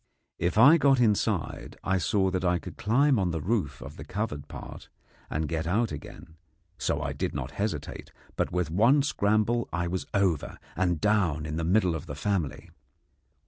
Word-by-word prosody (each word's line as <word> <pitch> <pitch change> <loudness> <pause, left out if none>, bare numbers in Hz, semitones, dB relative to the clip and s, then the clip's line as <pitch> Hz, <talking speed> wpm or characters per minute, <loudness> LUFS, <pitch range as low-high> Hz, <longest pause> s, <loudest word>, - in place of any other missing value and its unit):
If 85 +3 0
I 145 +9 +8
got 135 -3 +4
inside, 110 -4 0
I 95 0 +1
saw 95 +3 +1
that 95 0 -2
I 90 -1 +2
could - - -9
climb 130 +4 +3
on 95 -2 +1
the 85 -1 -2
roof 95 - -2
of 70 +2 -10
the 70 - -7
covered 75 -4 -4
part - - -10 0.4
and 75 0 -2
get 80 +1 -2
out 110 +7 +1
again; 80 - -10 0.4
so - - -1
I - - -2
did - - -3
not 65 -3 -4
hesitate, 90 -8 -4 0.2
but - - -1
with 90 -3 -1
one 120 - +4
scramble 110 -2 +1
I 85 +1 -1
was 90 +1 -3
over 95 -7 0 0.2
and 90 -3 +1
down 90 -7 +1
in 75 0 -4
the 85 - -1
middle 90 +1 +2
of 80 - -5
the 70 - -6
family. 85 -2 -2
95 Hz, 185 wpm, -28 LUFS, 80-110 Hz, 0.4 s, I